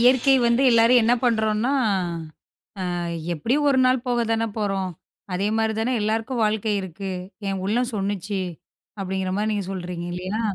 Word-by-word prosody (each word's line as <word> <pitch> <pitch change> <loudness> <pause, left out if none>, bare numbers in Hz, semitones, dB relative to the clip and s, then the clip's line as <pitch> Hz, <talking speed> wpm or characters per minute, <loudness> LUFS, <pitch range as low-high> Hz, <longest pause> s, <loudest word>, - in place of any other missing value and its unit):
இயற்கை 255 +2 +5
வந்து 235 +3 +3
எல்லாரும் 230 +1 +6
என்ன 235 +2 +4
பண்றோம்னா 220 +2 +2 1.2
அ - - -2 0.4
எப்படி 195 - 0
ஒரு 270 -2 +3
நாள் 255 -1 +2
போகத்தானே 230 -2 +1
போறோம். 195 -3 -1 0.4
அதே 195 +3 0
மாரி 220 0 +1
தான் 240 +1 +1
எல்லாருக்கும் 225 +3 -1
வாழ்க்கை 215 0 0
இருக்கு. 190 +1 -6 0.4
என் 190 -1 -2
உள்ளம் 240 +4 0
சொல்லுச்சி 200 0 -2 0.6
அப்படிங்கற 190 -1 -2
மாரி 215 +1 0
நீங்க 205 -3 -2
சொல்றீங்க 180 -2 -5
இல்லையா? 185 +5 -3
215 Hz, 140 wpm, -23 LUFS, 195-235 Hz, 1.2 s, எல்லாரும்